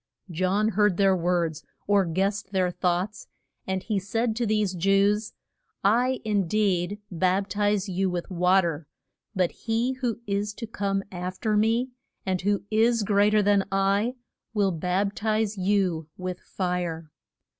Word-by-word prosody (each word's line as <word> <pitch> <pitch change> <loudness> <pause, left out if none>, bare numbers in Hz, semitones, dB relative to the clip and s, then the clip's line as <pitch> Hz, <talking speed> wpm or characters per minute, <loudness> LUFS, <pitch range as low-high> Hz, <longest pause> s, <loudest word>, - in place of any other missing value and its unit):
John 185 +5 +1
heard 210 -3 +2
their 195 -1 +4
words, 170 -3 0 0.2
or 200 -1 +3
guessed 195 +4 -1
their 185 -2 +2
thoughts, 180 +4 -2 0.4
and 190 0 -2
he 210 -4 -1
said 225 +4 -1
to 235 -1 0
these 210 -3 +1
Jews, 195 +4 +2 0.5
I 245 +6 +2
in 205 -4 0
deed 200 0 0
bap 185 +3 +1
tize 205 0 +1
you 190 0 0
with 175 -1 -3
wa 180 +2 +4
ter, 165 -3 -3 0.5
but 180 -2 +2
he 230 +2 -1
who 240 -4 0
is 205 0 -2
to 230 - -5
come 200 -3 -2
af 180 0 -5
fer 215 -1 0
me, 225 +4 +2 0.3
and 185 -2 -1
who 200 +1 0
is 225 +1 +3
great 205 +1 +3
er 210 - +4
than 200 -1 +3
I, 200 +5 +1 0.4
will 200 -2 +2
bap 180 +4 -1
tize 215 -1 0
you 185 -5 +1
with 185 -1 -4
fire. 175 -4 -3
195 Hz, 155 wpm, -26 LUFS, 180-210 Hz, 0.5 s, their